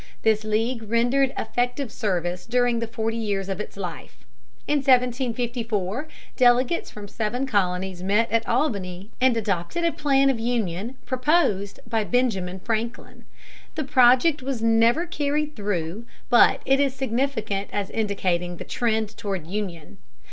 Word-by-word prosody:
This 220 -1 +3
league 220 +1 -1
rendered 245 +4 +2
effective 245 +1 -1
service 180 -4 -2
during 245 0 +2
the 230 - -3
forty 225 0 -2
years 200 -3 -2
of 195 0 -3
its 210 - -9
life. 175 - -7 0.4
In 295 - +2
1754 245 - 0 0.3
delegates 250 +5 +3
from 210 -1 -9
seven 225 +5 -2
colonies 190 -5 -1
met 205 +4 +1
at 230 0 +1
Albany 200 - -1
and 255 -2 +4
adopted 205 - -2
a 335 - +3
plan 275 -3 +3
of 245 - -3
union 225 -1 -2
proposed 255 - +1
by 225 -1 0
Benjamin 195 -6 0
Franklin. 230 +2 -4 0.5
The 310 - -1
project 260 +3 +4
was 255 -3 -3
never 230 +8 +4
carried 300 -2 -1
through, 200 +1 -3 0.2
but 240 - +5
it 270 +1 +3
is 275 -2 +1
significant 245 -6 -1
as 205 -1 -3
indicating 185 -5 -1
the - - -6
trend 220 -2 -1
toward 195 -7 -4
union. 180 -4 -5
230 Hz, 140 wpm, -24 LUFS, 200-255 Hz, 0.5 s, but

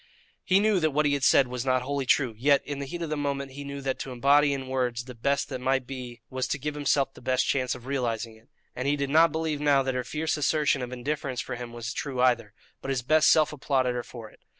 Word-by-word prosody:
He 190 +1 +4
knew 210 -2 +3
that 155 -2 +2
what 150 +1 +1
he 145 - +2
had 140 -1 -1
said 135 0 +5
was 125 -1 -4
not 130 -1 +1
wholly 140 0 -2
true, 130 -4 +2
yet, 140 +5 +3
in 145 -1 -5
the 140 - -5
heat 170 +4 -5
of 160 - -5
the - - 0
moment, 140 -2 -3
he 145 +2 -8
knew 140 0 -6
that 135 -1 -2
to 135 - -5
embody 140 +4 +4
in 135 -1 -3
words 125 -2 -1
the 125 - -9
best 140 +4 0
that 125 - -5
might 130 0 +1
be 125 -2 -8
was 130 0 -3
to - - -1
give 150 +2 -4
himself 140 -2 +1
the - - -15
best 130 +1 +1
chance 130 -2 0
of 125 -1 -12
realizing 120 -4 -2
it; 110 +4 -23 0.3
and 125 +2 -3
he 145 - +3
did 140 -1 -2
not 165 +1 +5
believe 160 -2 -2
now 140 -2 +4
that 130 0 -1
her 125 0 -2
fierce 155 +4 -2
assertion 150 -1 +1
of 125 0 -5
indifference 130 +1 -3
for - - -4
him 120 -1 -7
was 120 +1 -5
true 135 -3 -4
either, 120 -4 +2 0.3
but - - -6
his 130 -3 -1
best 155 +4 +4
self 155 -1 +4
applauded 130 -3 0
her 120 - -2
for 115 -2 -11
it. - - -22
135 Hz, 265 wpm, -27 LUFS, 125-145 Hz, 0.3 s, said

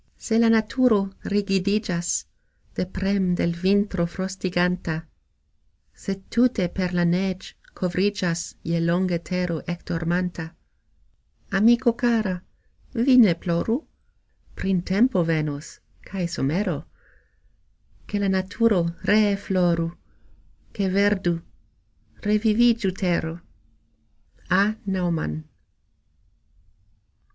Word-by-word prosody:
Se 225 -1 0
la 230 -1 +5
naturo 220 -3 +3
rigidigxas 195 -3 0 0.5
De 180 - -2
prem' 190 -1 0
de - - -1
l' 170 - 0
vintro 195 -3 +2
frostiganta, 180 -2 -2 0.9
Se 195 - -5 0.2
tute 235 -6 +3
per 180 -1 -2
la 175 -1 +1
negx' 185 +2 -1 0.2
kovrigxas 180 -2 -1
Je 170 0 0
longe 170 +1 +1
tero 180 -2 -2
ekdormanta, 170 -1 -3 1.0
Amiko 235 +5 +4
kara! 225 -7 0 0.5
vi 250 +3 +4
ne 210 -9 +7
ploru: 170 +7 0 0.8
Printempo 190 +3 +2
venos 155 -2 -2 0.3
kaj 190 -2 -4
somero, 170 +1 -1 1.3
Ke 205 - -2
la - - +2
naturo 200 +1 +2 0.2
ree 205 -1 +4
floru, 180 -4 +1 0.9
Ke 195 -3 -1
verdu, 190 -5 +2 0.8
revivigxu 215 -1 +3
tero. 170 -3 -1 1.1
A. 185 +2 +5 0.2
NAUMANN. 170 - -1
185 Hz, 90 wpm, -24 LUFS, 175-205 Hz, 1.3 s, ne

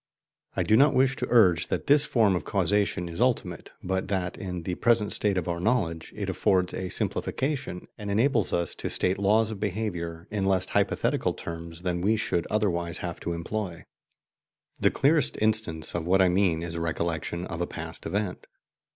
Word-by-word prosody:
I - - +1
do 110 - +3
not 140 +5 +5
wish 135 +1 +3
to 125 - -2
urge 90 -9 +4
that - - -2
this 145 +1 +5
form 110 -9 +3
of 85 - -2
causation 100 -3 0
is 85 +5 -5
ultimate, 110 -9 0
but 95 +1 -1
that, 95 -2 -2
in 90 -3 -5
the 90 - -2
present 110 +1 +2
state 100 -2 +1
of 90 - -2
our 85 -1 -2
knowledge, 85 -6 0
it - - -4
affords 90 -1 +1
a 95 -1 -4
simplification, 135 - -2
and 105 -1 -5
enables 115 +1 +2
us 85 0 -1
to - - -5
state 95 +1 +1
laws 105 +2 +3
of 105 - -6
behaviour 90 -5 -3
in 105 -2 -1
less 95 -1 +2
hypothetical - - 0
terms 85 +1 -8
than 90 -1 -1
we 105 +5 +3
should 85 -6 -1
otherwise 85 -5 0
have 85 -2 -5
to 85 - -3
employ. 85 +1 -4 0.9
The - - +4
clearest 150 0 +2
instance 110 -8 +1
of 85 -1 -3
what 95 +2 +4
I 95 -1 +5
mean 90 -3 +2
is 85 0 -4
recollection 85 +1 -2
of 85 -1 -5
a 85 - -1
past 80 0 -6
event. 95 +1 -3
95 Hz, 185 wpm, -27 LUFS, 85-110 Hz, 0.9 s, not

